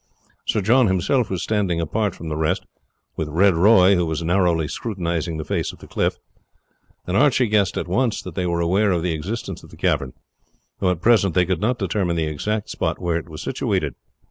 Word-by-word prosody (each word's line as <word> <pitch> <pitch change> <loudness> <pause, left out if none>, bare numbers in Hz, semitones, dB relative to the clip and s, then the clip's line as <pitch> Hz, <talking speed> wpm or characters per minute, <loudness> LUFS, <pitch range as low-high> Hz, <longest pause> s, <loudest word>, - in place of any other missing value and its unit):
Sir 105 - +1
John 120 +5 +4
himself 95 +7 +1
was 95 -2 -2
standing 100 -6 0
apart 105 +6 -1
from 80 - -8
the 75 - -3
rest, 75 0 -1 0.5
with 75 - -3
Red 95 +5 +4
Roy, 95 +2 +6
who 90 -2 +1
was 80 +1 -2
narrowly 85 -2 +2
scrutinizing 85 -5 -3
the 80 - -5
face - - -1
of - - -15
the - - -13
cliff, - - -1 0.9
and 90 - -2
Archie 130 +1 +4
guessed 105 -4 +1
at - - -3
once 115 +5 0
that - - -7
they 90 -2 -2
were 85 0 0
aware 95 +5 +2
of 85 -3 0
the 90 -2 0
existence 95 +9 -5
of - - -15
the - - -14
cavern, 65 -2 0 0.7
though 95 - +2
at 90 -2 -1
present 105 -6 +3
they 90 -1 +4
could 90 -2 -1
not 120 +4 +1
determine 95 -3 -1
the 80 - 0
exact 105 +8 -3
spot - - -2
where 85 -2 0
it 85 - -7
was 75 - -8
situated. - - -1
90 Hz, 210 wpm, -22 LUFS, 85-105 Hz, 0.9 s, Roy